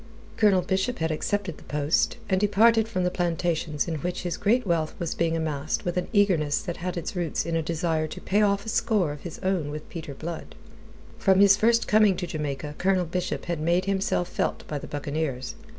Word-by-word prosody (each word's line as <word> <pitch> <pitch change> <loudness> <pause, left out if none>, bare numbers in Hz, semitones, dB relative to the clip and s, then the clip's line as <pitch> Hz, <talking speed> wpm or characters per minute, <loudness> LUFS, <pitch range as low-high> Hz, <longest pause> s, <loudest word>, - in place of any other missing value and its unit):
Colonel 195 -4 +4
Bishop 190 +7 0
had 160 -1 -1
accepted 185 +2 -2
the - - -15
post, 150 +7 0
and 190 -1 +1
departed 220 +2 +4
from 185 -5 -1
the 180 - +1
plantations 170 -3 -1
in 165 -2 -2
which 175 +5 -3
his 175 -1 -2
great 240 +4 +2
wealth 165 -4 0
was 170 -2 -2
being 165 -1 0
amassed 155 -2 -2
with 175 - -1
an 180 - -1
eagerness 185 -9 +3
that 175 - -4
had 180 0 -4
its 170 - -4
roots 175 -4 -1
in 165 - -2
a 165 - +1
desire 160 -1 -1
to - - -8
pay 205 +2 +1
off 200 -1 +2
a - - -4
score 215 -7 +1
of 145 -1 -8
his 170 - -7
own 185 -6 0
with 150 +1 -6
Peter 160 -5 -7
Blood. 165 +3 -7 0.6
From 190 -1 +4
his 200 0 +7
first 230 +3 +3
coming 210 -3 +4
to 180 - -2
Jamaica, 150 -3 -4
Colonel 185 -1 +2
Bishop 180 +2 -3
had 170 -2 -2
made 170 +4 +1
himself 195 -2 0
felt - - -2
by 150 - -3
the - - -8
buccaneers. 145 -2 -3
175 Hz, 210 wpm, -26 LUFS, 155-195 Hz, 0.6 s, his